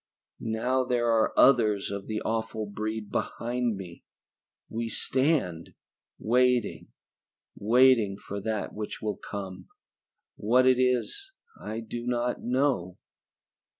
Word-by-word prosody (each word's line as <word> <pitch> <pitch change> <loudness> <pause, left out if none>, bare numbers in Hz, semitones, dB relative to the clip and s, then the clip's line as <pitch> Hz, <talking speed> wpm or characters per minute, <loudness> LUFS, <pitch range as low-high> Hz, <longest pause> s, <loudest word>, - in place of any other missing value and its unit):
"Now 125 +4 0
there 120 -2 +1
are 110 -1 +3
others 110 -7 +4
of 100 -1 -5
the 110 -1 -3
awful 110 -1 -2
breed 110 +1 -4
behind 120 -1 -1
me. 90 -3 -10 0.6
We 115 +1 -3
stand, 130 - 0 0.4
waiting, 125 +1 +1 0.7
waiting 115 -2 +4
for 100 0 -6
that 110 0 -3
which 105 0 -6
will 105 -3 -2
come. 95 -3 -7 0.7
What 125 +5 +3
it 130 -1 +5
is 130 - 0 0.3
I 110 +2 -4
do 120 +2 -6
not 120 0 -1
know." 125 -9 0
115 Hz, 115 wpm, -28 LUFS, 105-125 Hz, 0.7 s, it